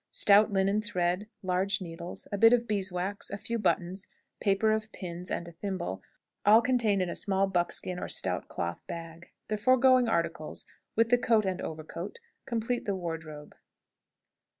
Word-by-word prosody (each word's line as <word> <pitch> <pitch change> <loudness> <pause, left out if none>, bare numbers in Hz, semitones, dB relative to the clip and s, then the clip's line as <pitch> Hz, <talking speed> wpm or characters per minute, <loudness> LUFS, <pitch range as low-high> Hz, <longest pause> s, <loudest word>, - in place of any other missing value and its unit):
Stout 210 +1 +5
linen 195 +2 +2
thread, 180 0 -1 0.2
large 185 +2 0
needles, 170 -1 -7
a 205 - -1
bit 225 +2 +7
of 240 -1 +2
beeswax, 195 -1 0
a 200 - -4
few 230 +3 -3
buttons, 190 -1 -1 0.3
paper 200 +2 +2
of 215 0 -1
pins, 180 -1 -6
and 170 - -3
a - - -9
thimble, 175 - -4 0.4
all 215 +2 +7
contained 230 -5 +2
in 180 - -3
a - - -3
small 195 -1 +2
buckskin 180 -1 0
or - - -4
stout - - 0
cloth 85 0 -4
bag. 165 0 -8 0.2
The 215 - -1
foregoing 255 +2 +5
articles, 170 -6 -1 0.3
with 230 +1 +3
the 245 0 +4
coat 225 -3 +3
and 190 -1 -2
overcoat, 160 - -6 0.3
complete 235 0 -2
the 200 - -1
wardrobe. 160 -4 -6
195 Hz, 160 wpm, -29 LUFS, 175-215 Hz, 0.4 s, bit